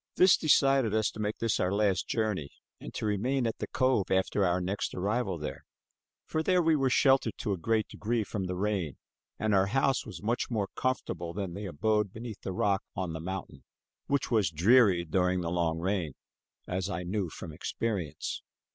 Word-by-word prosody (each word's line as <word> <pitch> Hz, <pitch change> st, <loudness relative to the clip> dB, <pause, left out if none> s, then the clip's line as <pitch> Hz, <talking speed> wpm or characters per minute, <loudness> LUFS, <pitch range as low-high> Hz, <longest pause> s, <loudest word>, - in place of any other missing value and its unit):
This 185 Hz, 0 st, +7 dB
decided 135 Hz, -7 st, +3 dB
us 110 Hz, -1 st, +2 dB
to -, -, -11 dB
make 105 Hz, 0 st, -2 dB
this 115 Hz, -2 st, 0 dB
our 90 Hz, -, +1 dB
last 100 Hz, -2 st, +1 dB
journey, 105 Hz, -10 st, -1 dB, 0.3 s
and -, -, -8 dB
to -, -, -3 dB
remain 120 Hz, +6 st, 0 dB
at 115 Hz, -, -2 dB
the -, -, -3 dB
cove 130 Hz, -7 st, +1 dB
after 95 Hz, +2 st, +2 dB
our 90 Hz, 0 st, +2 dB
next 95 Hz, +3 st, -2 dB
arrival 100 Hz, 0 st, -1 dB
there; 75 Hz, -1 st, -6 dB, 0.6 s
for 160 Hz, -, -1 dB
there 180 Hz, +3 st, +3 dB
we 160 Hz, -1 st, +4 dB
were 135 Hz, -3 st, +2 dB
sheltered, 135 Hz, -3 st, +3 dB
to 105 Hz, -, -1 dB
a -, -, -2 dB
great 110 Hz, +3 st, +1 dB
degree, 115 Hz, +1 st, -1 dB
from 100 Hz, -2 st, -4 dB
the 90 Hz, 0 st, -3 dB
rain 95 Hz, -6 st, -1 dB, 0.4 s
and 110 Hz, -1 st, 0 dB
our 95 Hz, 0 st, +4 dB
house 135 Hz, +4 st, +2 dB
was -, -, -9 dB
much 115 Hz, +3 st, 0 dB
more 105 Hz, -5 st, -1 dB
comfortable 85 Hz, -10 st, -2 dB
than 95 Hz, -3 st, -4 dB
the 100 Hz, +2 st, -5 dB
abode 105 Hz, +4 st, 0 dB
beneath 110 Hz, 0 st, -8 dB
the -, -, -4 dB
rock 100 Hz, -1 st, +1 dB
on 90 Hz, -3 st, -3 dB
the 80 Hz, -, -4 dB
mountain, 95 Hz, +4 st, -6 dB, 0.4 s
which 140 Hz, -1 st, 0 dB
was 110 Hz, -7 st, +3 dB
dreary 95 Hz, +2 st, +4 dB
during 90 Hz, +2 st, +1 dB
the 85 Hz, -1 st, -2 dB
long 85 Hz, -2 st, 0 dB
rain, 90 Hz, -4 st, -1 dB, 0.5 s
as 95 Hz, +1 st, -2 dB
I 90 Hz, -2 st, -3 dB
knew 95 Hz, 0 st, -2 dB
from 80 Hz, +1 st, -8 dB
experience. 90 Hz, -1 st, -3 dB
100 Hz, 190 wpm, -30 LUFS, 90-115 Hz, 0.6 s, This